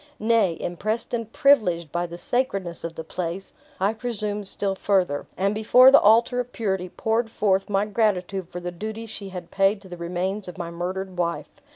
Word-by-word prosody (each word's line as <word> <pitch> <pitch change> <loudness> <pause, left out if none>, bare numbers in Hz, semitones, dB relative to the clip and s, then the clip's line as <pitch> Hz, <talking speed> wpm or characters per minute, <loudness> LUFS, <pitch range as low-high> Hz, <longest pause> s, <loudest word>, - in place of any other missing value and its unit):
Nay, 215 -6 +2
impressed 215 +8 -3
and 230 -2 -3
privileged 180 - +3
by 175 0 -1
the 170 0 -8
sacredness 195 -7 -2
of 165 0 -5
the 160 - -5
place, 175 +3 -5 0.3
I 195 +3 +2
presumed 210 -3 -4
still 195 0 -2
further, 190 -7 0
and 195 +2 +1
before 245 +5 +7
the 280 - +8
altar 230 +4 +4
of 250 0 -3
purity 190 -6 -2
poured 225 +4 -1
forth 195 -3 +1
my 200 0 +2
gratitude 195 -4 0
for 180 - -6
the 175 0 -5
duties 220 +5 -6
she 200 -3 -6
had 180 -2 -8
paid 195 +1 +2
to 190 - -13
the 175 - -8
remains 180 +4 -3
of 180 - -8
my 170 -2 -5
murdered 180 +2 -4
wife. 170 -1 -2
195 Hz, 190 wpm, -24 LUFS, 175-220 Hz, 0.3 s, the